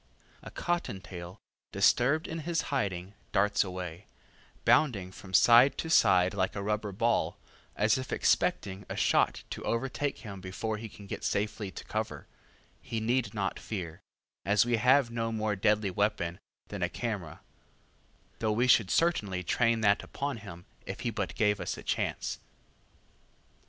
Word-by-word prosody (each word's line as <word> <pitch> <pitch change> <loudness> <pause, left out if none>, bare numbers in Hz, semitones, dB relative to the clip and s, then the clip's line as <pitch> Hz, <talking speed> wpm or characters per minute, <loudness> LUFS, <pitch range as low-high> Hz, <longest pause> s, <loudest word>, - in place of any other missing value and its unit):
A - - -9
cotton 175 - -2
tail, 90 -1 -9 0.3
disturbed 125 - +3
in 165 - -4
his 165 +1 -1
hiding, 95 -7 -2 0.2
darts 100 +1 +3
away, 90 -1 -6 0.6
bounding 100 -11 +3
from 95 0 -12
side 120 +7 +6
to 160 - -3
side 95 - +5
like 95 -2 -1
a 100 - -3
rubber 105 0 -1
ball, 100 -5 0 0.4
as 110 +4 +2
if 130 - -6
expecting 95 +1 +1
a - - -4
shot - - +2
to - - -5
overtake 135 +4 -1
him 100 -3 -7
before 105 +4 -3
he 110 +1 -7
can 100 - -13
get - - -6
safely 105 0 -1
to 95 - -9
cover - - -4 0.6
He 115 - -3
need 120 +2 0
not 95 -2 -2
fear, 90 -4 -6 0.4
as 105 +2 +3
we 120 -1 +2
have 125 +1 +4
no 115 -1 -2
more 110 -2 -1
deadly 105 0 +2
weapon 90 -3 -1 0.3
than 100 -2 -6
a 90 - +1
camera, 100 -7 -4 1.0
though 110 -1 +1
we 120 +4 +2
should 115 -6 +5
certainly 105 - +1
train 115 +4 +2
that 100 -1 +4
upon 140 -2 -4
him 90 -5 -10 0.2
if - - -7
he - - -1
but - - -3
gave 105 -1 +2
us - - -3
a - - -9
chance. - - -2
105 Hz, 155 wpm, -30 LUFS, 95-120 Hz, 1.0 s, side